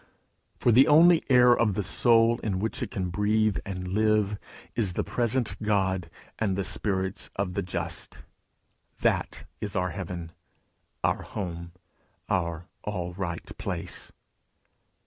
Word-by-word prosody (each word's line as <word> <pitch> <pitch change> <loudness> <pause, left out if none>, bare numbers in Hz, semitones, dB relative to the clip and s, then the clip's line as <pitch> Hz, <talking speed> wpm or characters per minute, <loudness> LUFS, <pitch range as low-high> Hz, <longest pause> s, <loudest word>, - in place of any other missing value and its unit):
For 120 - +3
the 130 +6 +7
only 165 +2 +6
air 125 -1 +7
of 110 -6 +1
the 105 - -1
soul, 115 +4 +4
in 100 -4 -2
which 110 +4 -2
it - - -2
can 95 -2 -3
breathe 105 +2 +2
and 90 -2 -4
live, 105 0 +2 0.4
is 105 -7 0
the - - -1
present 120 0 0
God 95 -5 0 0.3
and 100 -4 +1
the 100 - -1
spirits 95 -1 -2
of 95 -2 -2
the - - -1
just: 90 - -4 0.8
that - - 0
is 105 -1 -4
our 90 -1 0
heaven, 85 -3 -6 0.7
our - - +1
home, 85 -4 -6 0.6
our 85 -2 -1 0.2
all 90 -4 -3
right 85 -2 -5
place. - - -3
100 Hz, 135 wpm, -27 LUFS, 90-110 Hz, 0.8 s, the